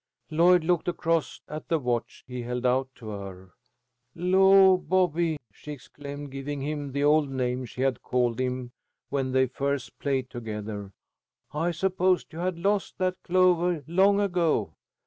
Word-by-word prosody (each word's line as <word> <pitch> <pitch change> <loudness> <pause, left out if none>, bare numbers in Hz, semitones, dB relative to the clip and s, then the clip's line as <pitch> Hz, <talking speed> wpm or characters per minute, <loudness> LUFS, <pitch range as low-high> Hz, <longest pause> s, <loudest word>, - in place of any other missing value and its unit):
Lloyd 175 +2 +5
looked 175 0 +1
across 165 -2 -1
at 155 +1 -7
the 165 - +2
watch 120 -4 -3
he 125 0 -6
held 125 +1 -4
out 130 +1 +2
to 115 -3 -9
her. 95 -3 -8 0.6
"Law, 190 +2 +6
Bobby," 170 -2 +1
she 150 +9 -9
exclaimed, 145 +1 -9
giving 140 +1 -5
him 145 -1 -3
the 140 +2 -1
old 150 0 +4
name 130 -1 -2
she 125 +2 -7
had 130 -3 0
called 125 -1 0
him 125 -1 -2 0.4
when 135 -2 -1
they 130 0 +3
first 140 +1 -3
played 135 -3 -1
together, 105 -4 -6 0.6
"I 160 +3 0
supposed 185 +1 0
you 160 - -7
had 180 0 -1
lost 200 +3 0
that 185 -1 -1
clovah 180 -3 +2
long 195 +5 +3
ago." 180 -5 +1
145 Hz, 150 wpm, -27 LUFS, 125-175 Hz, 0.6 s, Law